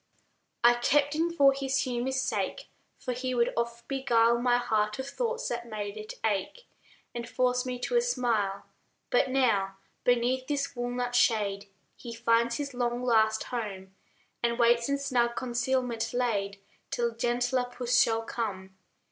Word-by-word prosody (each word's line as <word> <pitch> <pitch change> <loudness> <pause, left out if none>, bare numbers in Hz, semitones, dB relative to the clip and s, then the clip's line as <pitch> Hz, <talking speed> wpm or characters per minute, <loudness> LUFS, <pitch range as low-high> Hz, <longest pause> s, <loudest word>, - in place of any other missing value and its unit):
I 240 0 +8
kept 285 +4 +2
him 330 +2 +1
for 280 -5 +5
his 270 0 0
humor's 255 +1 -1
sake, 265 - -2 0.3
For 255 - -4
he 255 +1 -3
would 235 0 +2
oft 235 0 -3
beguile 235 -4 +2
My 245 0 +3
heart 215 -3 0
of 265 0 -5
thoughts 475 - -2
that 235 0 -4
made 205 -2 -4
it 215 0 -7
ache, 215 - -2 0.5
And 240 0 -5
force 250 0 +1
me 250 0 -3
to - - -2
a - - +5
smile. 230 - 0 0.5
But - - +3
now, 205 -8 +1 0.3
beneath 250 +1 +1
this 280 -1 -2
walnut 245 0 -2
shade 205 -4 +2 0.3
He 235 -1 -8
finds 235 0 +2
his 280 -2 -4
long, 245 0 -1
last 220 -2 +3
home, 195 -6 -5 0.5
And 235 0 0
waits, 235 +1 +3
in 280 - +1
snug 245 -4 0
concealment 245 -2 -1
laid, 200 -5 -1 0.3
Till 235 -1 -1
gentler 245 +2 0
Puss 245 0 +1
shall 225 0 +2
come. 190 -5 -4
240 Hz, 155 wpm, -29 LUFS, 230-255 Hz, 0.5 s, I